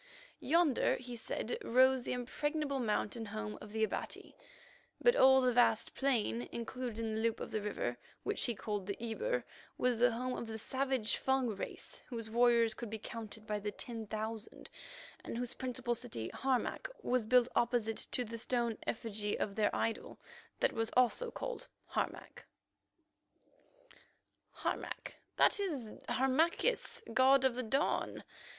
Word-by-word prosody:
Yonder, 320 Hz, -2 st, +3 dB
he 245 Hz, -1 st, -7 dB
said, 230 Hz, 0 st, -3 dB
rose 260 Hz, +2 st, +5 dB
the -, -, -4 dB
impregnable 280 Hz, +3 st, -1 dB
mountain 225 Hz, 0 st, -1 dB
home 215 Hz, +1 st, -4 dB
of 210 Hz, -, -9 dB
the 220 Hz, 0 st, 0 dB
Abati, 220 Hz, -, -3 dB, 0.6 s
but 485 Hz, 0 st, +5 dB
all 265 Hz, -, +7 dB
the 250 Hz, -1 st, +3 dB
vast 235 Hz, -2 st, +3 dB
plain 215 Hz, -, 0 dB
included 235 Hz, 0 st, -4 dB
in 225 Hz, -1 st, -2 dB
the 220 Hz, -, -1 dB
loop 230 Hz, 0 st, +1 dB
of -, -, -5 dB
the 215 Hz, -, -1 dB
river 120 Hz, -12 st, -2 dB, 0.2 s
which -, -, 0 dB
he 240 Hz, -, -1 dB
called 205 Hz, -1 st, -3 dB
Ebur, 460 Hz, -, -1 dB, 0.3 s
was 250 Hz, -2 st, +2 dB
the 245 Hz, +1 st, +6 dB
home 250 Hz, +2 st, -2 dB
of 235 Hz, -, -5 dB
the 220 Hz, 0 st, -5 dB
savage 260 Hz, -1 st, 0 dB
Fung 265 Hz, -2 st, +1 dB
race, 205 Hz, -3 st, -5 dB
whose 230 Hz, -3 st, -6 dB
warriors 235 Hz, -1 st, +4 dB
could 235 Hz, 0 st, -6 dB
be 220 Hz, -, -4 dB
counted 220 Hz, -1 st, -7 dB
by 210 Hz, -1 st, -1 dB
the 210 Hz, +1 st, -2 dB
ten 225 Hz, +1 st, -4 dB
thousand, 220 Hz, +1 st, -5 dB, 0.5 s
and -, -, -5 dB
whose 245 Hz, 0 st, -2 dB
principal 250 Hz, -1 st, -2 dB
city, 230 Hz, -, -4 dB
Harmac, 265 Hz, -2 st, -1 dB
was 245 Hz, -3 st, +1 dB
built 250 Hz, 0 st, +6 dB
opposite 235 Hz, -2 st, +1 dB
to 250 Hz, -, +2 dB
the 230 Hz, +1 st, -6 dB
stone 235 Hz, -1 st, 0 dB
effigy 210 Hz, -2 st, -1 dB
of 200 Hz, -, -1 dB
their 210 Hz, 0 st, +2 dB
idol, 225 Hz, -, -2 dB, 0.4 s
that -, -, +2 dB
was 225 Hz, 0 st, 0 dB
also 255 Hz, -, +3 dB
called -, -, -5 dB, 0.2 s
Harmac—— -, -, -3 dB, 2.1 s
"Harmac—that -, -, 0 dB
is 285 Hz, -, -2 dB, 0.2 s
Harmachis, 330 Hz, -, +2 dB
god 265 Hz, +2 st, +6 dB
of 250 Hz, -3 st, 0 dB
dawn. 275 Hz, +4 st, 0 dB
235 Hz, 145 wpm, -35 LUFS, 220-260 Hz, 2.1 s, all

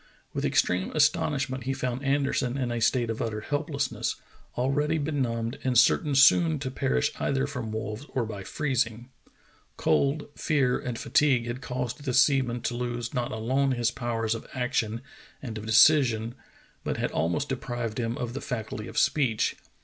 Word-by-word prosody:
With -, -, -2 dB
extreme 90 Hz, +1 st, +1 dB
astonishment 145 Hz, -4 st, +1 dB
he 135 Hz, -, 0 dB
found 130 Hz, 0 st, -3 dB
Anderson 135 Hz, -2 st, 0 dB
in 125 Hz, -3 st, -1 dB
a 120 Hz, -1 st, -2 dB
state 115 Hz, 0 st, +2 dB
of 115 Hz, -, -4 dB
utter 110 Hz, -2 st, -2 dB
helplessness, 145 Hz, +1 st, -2 dB, 0.4 s
already 145 Hz, +5 st, +1 dB
benumbed 130 Hz, -6 st, -2 dB
and 130 Hz, -2 st, +1 dB
certain 140 Hz, +3 st, +4 dB
soon 155 Hz, +4 st, +6 dB
to 130 Hz, -2 st, -4 dB
perish 65 Hz, -, 0 dB
either 135 Hz, 0 st, 0 dB
from 125 Hz, -6 st, -5 dB
wolves 110 Hz, +5 st, -5 dB
or 125 Hz, -3 st, -1 dB
by 105 Hz, -3 st, -6 dB
freezing. 125 Hz, -2 st, -2 dB, 0.7 s
Cold, 140 Hz, +2 st, +1 dB
fear, 135 Hz, -6 st, +1 dB
and 125 Hz, -2 st, -4 dB
fatigue 130 Hz, -4 st, +2 dB
had 120 Hz, +2 st, -5 dB
caused 125 Hz, +2 st, -4 dB
the 130 Hz, -3 st, -1 dB
seaman 130 Hz, -3 st, +3 dB
to -, -, -2 dB
lose 120 Hz, -1 st, -3 dB
not 120 Hz, -1 st, -1 dB
alone 130 Hz, +5 st, +1 dB
his 120 Hz, -2 st, +1 dB
power 120 Hz, -2 st, -2 dB
of 115 Hz, +1 st, -2 dB
action 120 Hz, -3 st, -1 dB, 0.4 s
and 115 Hz, -5 st, -6 dB
of 110 Hz, -, -8 dB
de -, -, -2 dB
cision, 120 Hz, -4 st, +5 dB, 0.5 s
but -, -, -2 dB
had -, -, -1 dB
almost 90 Hz, -, 0 dB
deprived 120 Hz, -4 st, -3 dB
him 115 Hz, 0 st, -2 dB
of 120 Hz, -1 st, -4 dB
the 140 Hz, -, -5 dB
faculty 115 Hz, -3 st, -5 dB
of -, -, -9 dB
speech. 125 Hz, -8 st, +2 dB
125 Hz, 165 wpm, -27 LUFS, 115-140 Hz, 0.7 s, soon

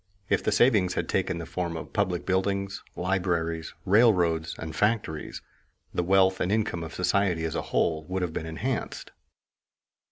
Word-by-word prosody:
If -, -, +2 dB
the -, -, +1 dB
savings 105 Hz, -5 st, +3 dB
had -, -, -1 dB
taken 95 Hz, -2 st, 0 dB
the 85 Hz, -, -5 dB
form 85 Hz, 0 st, -3 dB
of -, -, -8 dB
public 95 Hz, -4 st, 0 dB
buildings, 100 Hz, +1 st, -1 dB
libraries, 85 Hz, -3 st, -1 dB
railroads, 90 Hz, -6 st, +3 dB
and 80 Hz, -1 st, -6 dB
factories, 105 Hz, -8 st, -1 dB, 0.5 s
the -, -, +1 dB
wealth 95 Hz, +1 st, +3 dB
and 90 Hz, -, 0 dB
income 105 Hz, -6 st, 0 dB
of 80 Hz, -, -7 dB
society 90 Hz, -2 st, +1 dB
as 80 Hz, -, -2 dB
a -, -, -1 dB
whole 80 Hz, -1 st, +1 dB
would 95 Hz, +2 st, -2 dB
have 85 Hz, -3 st, -2 dB
been 80 Hz, -, -4 dB
enhanced. 80 Hz, 0 st, -3 dB
90 Hz, 160 wpm, -27 LUFS, 85-100 Hz, 0.5 s, savings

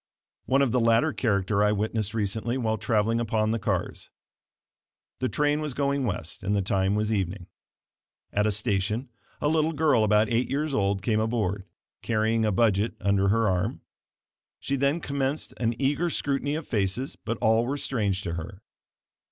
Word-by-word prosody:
One 135 Hz, +1 st, +4 dB
of 130 Hz, -, +1 dB
the 125 Hz, -, +2 dB
latter 115 Hz, +6 st, +3 dB
character 100 Hz, -3 st, +1 dB
I 105 Hz, -, +3 dB
witnessed 110 Hz, 0 st, -1 dB
recently 110 Hz, +3 st, -1 dB
while 110 Hz, -3 st, -1 dB
traveling 115 Hz, -1 st, +1 dB
upon 110 Hz, -2 st, 0 dB
the 115 Hz, -, 0 dB
cars. -, -, -3 dB, 1.1 s
The 130 Hz, -, 0 dB
train 150 Hz, +1 st, +1 dB
was 150 Hz, -4 st, -4 dB
going 140 Hz, -1 st, 0 dB
west 90 Hz, -6 st, -4 dB
and 100 Hz, +2 st, 0 dB
the 100 Hz, -, +1 dB
time 95 Hz, +1 st, +1 dB
was 105 Hz, +1 st, 0 dB
evening. 95 Hz, -2 st, -2 dB, 0.9 s
At 105 Hz, +1 st, +2 dB
a -, -, +2 dB
station 105 Hz, +3 st, -1 dB, 0.3 s
a -, -, +1 dB
little 160 Hz, +1 st, +2 dB
girl 145 Hz, -7 st, +3 dB
about 105 Hz, +1 st, +3 dB
eight 120 Hz, +3 st, 0 dB
years 145 Hz, +2 st, -1 dB
old 100 Hz, -3 st, 0 dB
came 110 Hz, -1 st, +1 dB
aboard, 105 Hz, -4 st, -1 dB, 0.4 s
carrying 110 Hz, 0 st, +1 dB
a 105 Hz, -, +2 dB
budget 105 Hz, +1 st, +2 dB
under 100 Hz, -1 st, +2 dB
her 115 Hz, +2 st, +3 dB
arm. 90 Hz, -2 st, -1 dB, 0.8 s
She 140 Hz, -, -2 dB
then 140 Hz, +5 st, +1 dB
commenced 140 Hz, +1 st, -2 dB
an 115 Hz, -1 st, 0 dB
eager 145 Hz, +6 st, +1 dB
scrutiny 145 Hz, -1 st, -1 dB
of 160 Hz, -1 st, -5 dB
faces, 105 Hz, +4 st, -1 dB
but 115 Hz, -, -4 dB
all 110 Hz, +2 st, +2 dB
were 140 Hz, +2 st, -1 dB
strange 105 Hz, -8 st, -1 dB
to 85 Hz, -, -3 dB
her. 90 Hz, +5 st, -7 dB
110 Hz, 170 wpm, -26 LUFS, 100-135 Hz, 1.1 s, One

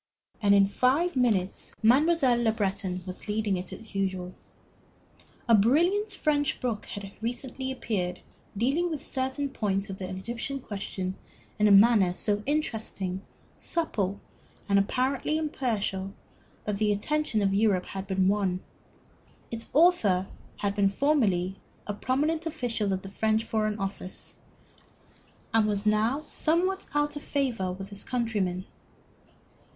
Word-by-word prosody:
And 200 Hz, -1 st, +5 dB
in 200 Hz, 0 st, +6 dB
five 265 Hz, -, +2 dB
minutes 215 Hz, -7 st, +1 dB
Mademoiselle 260 Hz, 0 st, +4 dB
Le 225 Hz, -2 st, +3 dB
Breton 190 Hz, -4 st, -2 dB
was 185 Hz, +2 st, -6 dB
leading 210 Hz, -1 st, 0 dB
it 180 Hz, 0 st, -4 dB
as 225 Hz, -1 st, -10 dB
usual. 190 Hz, -2 st, -2 dB, 1.1 s
A 230 Hz, -, +5 dB
brilliant 340 Hz, -, +4 dB
French 295 Hz, -7 st, 0 dB
book 235 Hz, -4 st, -2 dB
had 200 Hz, -1 st, -7 dB
recently 255 Hz, +3 st, -3 dB
appeared 185 Hz, -8 st, -2 dB, 0.4 s
dealing 280 Hz, -, +1 dB
with 305 Hz, -3 st, -5 dB
certain 265 Hz, +2 st, -1 dB
points 200 Hz, -6 st, -1 dB
of 190 Hz, -, -7 dB
the 185 Hz, -1 st, -4 dB
Egyptian 235 Hz, +8 st, -4 dB
question 195 Hz, -5 st, -4 dB, 0.5 s
in 210 Hz, -, +5 dB
a -, -, +5 dB
manner 200 Hz, -3 st, +6 dB
so 205 Hz, +2 st, 0 dB
interesting, 220 Hz, -10 st, -2 dB, 0.4 s
supple, 205 Hz, -, -1 dB, 0.5 s
and 200 Hz, -1 st, +4 dB
apparently 260 Hz, +8 st, 0 dB
impartial 210 Hz, -10 st, -2 dB, 0.5 s
that 210 Hz, -1 st, -1 dB
the 210 Hz, 0 st, +2 dB
attention 220 Hz, +1 st, 0 dB
of 195 Hz, -1 st, +2 dB
Europe 200 Hz, -3 st, +2 dB
had 195 Hz, 0 st, -6 dB
been 190 Hz, -1 st, +2 dB
won. 195 Hz, -2 st, +1 dB, 0.9 s
Its 230 Hz, 0 st, -4 dB
author 265 Hz, -, +4 dB, 0.3 s
had 200 Hz, -1 st, -1 dB
been 200 Hz, -1 st, +3 dB
formerly 195 Hz, -8 st, +1 dB, 0.3 s
a 205 Hz, -, -3 dB
prominent 300 Hz, +9 st, 0 dB
official 240 Hz, -10 st, -1 dB
of 190 Hz, 0 st, -2 dB
the 195 Hz, -, -7 dB
French 220 Hz, +2 st, +1 dB
Foreign 215 Hz, -2 st, -1 dB
Office, 195 Hz, -2 st, -5 dB, 1.2 s
and 225 Hz, -1 st, +4 dB
was 205 Hz, 0 st, -1 dB
now 220 Hz, +7 st, +2 dB
somewhat 365 Hz, +7 st, 0 dB
out 295 Hz, 0 st, +1 dB
of 290 Hz, -, -5 dB
favor 245 Hz, -12 st, -1 dB
with 195 Hz, +2 st, -7 dB
his 200 Hz, -1 st, -7 dB
countrymen. 205 Hz, -7 st, -1 dB
215 Hz, 135 wpm, -28 LUFS, 195-265 Hz, 1.2 s, in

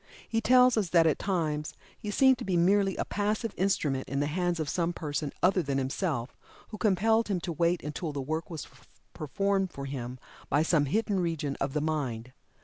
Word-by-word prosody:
He 225 Hz, 0 st, 0 dB
tells 250 Hz, 0 st, +5 dB
us 200 Hz, -5 st, +1 dB
that 165 Hz, -1 st, +5 dB
at 160 Hz, -, +2 dB
times 155 Hz, -6 st, -2 dB, 0.2 s
he 210 Hz, -, -7 dB
seemed 260 Hz, +4 st, +4 dB
to -, -, -4 dB
be 185 Hz, -2 st, 0 dB
merely 195 Hz, +2 st, +3 dB
a -, -, -1 dB
passive 210 Hz, +2 st, -1 dB
instrument 150 Hz, -8 st, 0 dB
in 140 Hz, +1 st, -1 dB
the 145 Hz, -, +1 dB
hands 175 Hz, +3 st, -1 dB
of 155 Hz, -, -2 dB
some 170 Hz, +3 st, 0 dB
person 150 Hz, -3 st, -3 dB
other 185 Hz, +1 st, +4 dB
than 140 Hz, -4 st, -2 dB
himself, 135 Hz, -1 st, -2 dB, 0.3 s
who 215 Hz, -, -8 dB
compelled 220 Hz, +3 st, +2 dB
him 195 Hz, -3 st, 0 dB
to 175 Hz, -, -3 dB
wait 170 Hz, +1 st, +1 dB
until 150 Hz, +2 st, -4 dB
the 145 Hz, -, -4 dB
work 155 Hz, +5 st, -3 dB
was 160 Hz, -4 st, -6 dB, 0.5 s
performed 195 Hz, +4 st, -1 dB
for 140 Hz, -, -7 dB
him 130 Hz, -2 st, -5 dB, 0.3 s
by 145 Hz, -, +3 dB
some 160 Hz, -3 st, +2 dB
hidden 205 Hz, +5 st, 0 dB
region 160 Hz, -5 st, -1 dB
of 135 Hz, 0 st, -1 dB
the 150 Hz, -, 0 dB
mind. 130 Hz, -6 st, -2 dB
170 Hz, 200 wpm, -29 LUFS, 145-195 Hz, 0.5 s, tells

